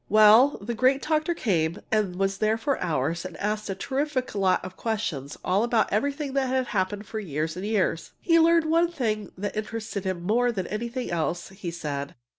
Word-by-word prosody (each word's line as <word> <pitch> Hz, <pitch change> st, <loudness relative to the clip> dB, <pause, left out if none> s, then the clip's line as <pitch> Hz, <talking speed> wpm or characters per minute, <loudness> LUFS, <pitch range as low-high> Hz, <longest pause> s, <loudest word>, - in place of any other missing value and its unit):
Well, 215 Hz, +6 st, +7 dB
the 225 Hz, +4 st, -4 dB
great 255 Hz, +4 st, +2 dB
doctor 310 Hz, +2 st, +1 dB
came 170 Hz, -, 0 dB
and 210 Hz, -4 st, +1 dB
was 195 Hz, +1 st, -1 dB
there 215 Hz, +1 st, +2 dB
for 265 Hz, +5 st, -1 dB
hours 165 Hz, -1 st, -1 dB
and 185 Hz, -2 st, -7 dB
asked 210 Hz, +1 st, -2 dB
a 195 Hz, -, -2 dB
terrific 270 Hz, +4 st, -2 dB
lot 195 Hz, -3 st, +1 dB
of 185 Hz, -, -8 dB
questions 165 Hz, -, -3 dB
all 190 Hz, +4 st, +2 dB
about 235 Hz, -2 st, +1 dB
everything 280 Hz, +5 st, -1 dB
that 275 Hz, -1 st, +1 dB
had 260 Hz, 0 st, +1 dB
happened 205 Hz, +1 st, -1 dB
for 220 Hz, +1 st, -5 dB
years 155 Hz, -4 st, -3 dB
and 185 Hz, -, -6 dB
years. 195 Hz, -6 st, 0 dB
He 335 Hz, -1 st, +4 dB
learned 330 Hz, 0 st, +5 dB
one 335 Hz, +2 st, +3 dB
thing 215 Hz, -, -2 dB
that 205 Hz, +2 st, -4 dB
interested 215 Hz, -1 st, -4 dB
him 185 Hz, -3 st, -3 dB
more 240 Hz, +6 st, +2 dB
than 190 Hz, -6 st, -3 dB
anything 235 Hz, +4 st, -4 dB
else, 170 Hz, +1 st, -2 dB
he 190 Hz, -2 st, -6 dB
said. 145 Hz, -4 st, -5 dB
215 Hz, 195 wpm, -26 LUFS, 185-255 Hz, -, Well